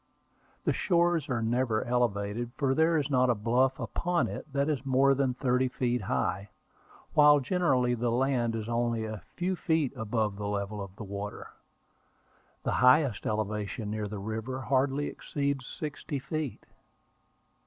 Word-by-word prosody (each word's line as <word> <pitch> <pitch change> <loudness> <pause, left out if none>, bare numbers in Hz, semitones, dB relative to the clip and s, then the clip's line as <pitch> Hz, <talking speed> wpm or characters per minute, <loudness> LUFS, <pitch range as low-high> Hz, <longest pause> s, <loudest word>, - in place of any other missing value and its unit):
The - - +2
shores 170 -4 +2
are 120 -3 0
never 115 -1 +1
elevated, 120 -1 -1
for 135 -3 +2
there 160 +3 +3
is 145 -1 -1
not 130 -1 +3
a 120 - +3
bluff 125 +5 +1
upon 175 0 0
it 150 - -7
that 140 +1 +1
is 145 -4 -1
more 135 +1 +4
than 135 -2 0
thirty 125 0 +1
feet 125 -1 -1
high, 95 +4 -1 0.6
while 145 -1 +7
generally 130 -5 +2
the 120 0 0
land 120 -1 +1
is 110 -1 -4
only 115 -1 0
a 110 -3 -6
few 185 +1 -1
feet 160 -6 0
above 110 -2 -1
the 100 0 -3
level 100 0 -3
of 100 -1 -8
the 110 - -8
water. 100 +1 -6 1.1
The - - 0
highest 125 -2 +4
elevation 105 0 -2
near 105 -1 -2
the 105 +1 -6
river 110 +5 -4
hardly 135 +2 +1
exceeds 140 -4 -3
sixty 150 -1 -5
feet. 155 0 -4
125 Hz, 155 wpm, -29 LUFS, 110-140 Hz, 1.1 s, while